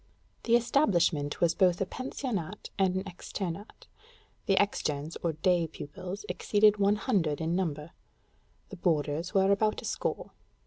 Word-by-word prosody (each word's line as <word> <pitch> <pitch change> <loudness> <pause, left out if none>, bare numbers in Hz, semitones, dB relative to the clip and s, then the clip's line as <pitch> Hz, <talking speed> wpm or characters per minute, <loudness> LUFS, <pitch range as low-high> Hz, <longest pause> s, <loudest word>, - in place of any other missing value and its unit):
The 235 - +4
establishment 180 - +2
was 170 -1 +4
both 180 -1 +3
a 195 - +1
pensionnat 210 - -5
and 190 -1 +3
an 190 - -1
externat: 190 +1 -6 0.6
the 195 - +4
externes 155 -6 0
or 170 -2 0
day 170 +2 +2
pupils 180 +6 -7
exceeded 210 0 +3
one 200 0 +3
hundred 185 - 0
in 165 +1 -1
number; 160 -4 -2 0.8
the 195 - -9
boarders 160 +1 0
were 195 0 +4
about 215 +2 +2
a - - -6
score. - - -3
185 Hz, 140 wpm, -29 LUFS, 165-205 Hz, 0.8 s, The